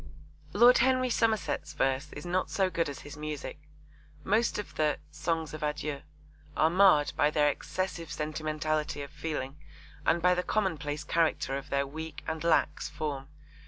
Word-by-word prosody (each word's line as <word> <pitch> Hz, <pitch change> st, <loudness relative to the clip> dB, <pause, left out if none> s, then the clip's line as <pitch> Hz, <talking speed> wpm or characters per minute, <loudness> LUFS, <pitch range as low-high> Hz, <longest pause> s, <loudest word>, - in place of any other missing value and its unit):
Lord 245 Hz, +1 st, +7 dB
Henry 255 Hz, -1 st, +3 dB
Somerset's 220 Hz, -9 st, 0 dB
verse 135 Hz, +2 st, 0 dB
is -, -, -8 dB
not 180 Hz, +1 st, 0 dB
so 190 Hz, -2 st, +1 dB
good 165 Hz, -4 st, 0 dB
as 140 Hz, -, -7 dB
his 145 Hz, -, -9 dB
music. 150 Hz, -2 st, -6 dB, 0.6 s
Most 220 Hz, +4 st, +2 dB
of 210 Hz, -, -5 dB
the 150 Hz, -1 st, +1 dB
Songs 160 Hz, +1 st, -2 dB
of 155 Hz, -, -6 dB
Adieu 150 Hz, -1 st, -2 dB, 0.6 s
are 160 Hz, +1 st, +4 dB
marred 180 Hz, -5 st, +5 dB
by 145 Hz, -, +3 dB
their 150 Hz, -1 st, +3 dB
excessive 175 Hz, +2 st, -3 dB
sentimentality 155 Hz, -1 st, -2 dB
of 140 Hz, -, -9 dB
feeling 150 Hz, -3 st, -4 dB, 0.5 s
and 165 Hz, +3 st, +3 dB
by 180 Hz, +1 st, +4 dB
the 180 Hz, -, +1 dB
commonplace 160 Hz, -8 st, -1 dB
character 160 Hz, -3 st, +1 dB
of 140 Hz, -, -6 dB
their 140 Hz, 0 st, +1 dB
weak 160 Hz, +2 st, -7 dB
and 160 Hz, 0 st, -3 dB
lax 160 Hz, -2 st, +2 dB
form. 140 Hz, -3 st, -4 dB
155 Hz, 160 wpm, -30 LUFS, 145-180 Hz, 0.6 s, Lord